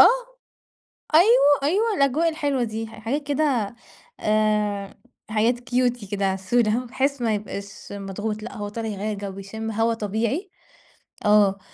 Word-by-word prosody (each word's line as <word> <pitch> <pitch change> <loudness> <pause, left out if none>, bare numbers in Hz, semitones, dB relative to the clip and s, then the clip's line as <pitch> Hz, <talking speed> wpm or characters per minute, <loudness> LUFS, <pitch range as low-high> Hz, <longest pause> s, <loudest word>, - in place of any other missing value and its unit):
آه، - - +11 1.1
أيوه، 335 - +6
أيوه، 415 +9 +2
الأجواء 280 +5 +3
الحلوة 285 -5 0
دي 225 0 -3
ح - - -12
حاجات 280 +6 -3
كده 270 -8 +1 0.4
آآ، 210 -2 0 0.3
حاجات 225 +3 +2
Cutie 245 -4 0
كده 200 -1 0
عسولة، 215 +5 +1
بحيث 265 +2 -1
ما 225 -2 +1
يبقاش 200 -1 -7
مضغوط، 205 +2 -4
لأ 235 - -7
هو 205 0 -4
طالع 225 +2 -4
يغيَّر 210 0 -3
جو 195 -1 -6
ويشم 220 +3 -5
هوا 225 +2 +1
طبيعي، 225 - -2 0.8
آه، 205 -2 +5
225 Hz, 140 wpm, -24 LUFS, 205-265 Hz, 1.1 s, آه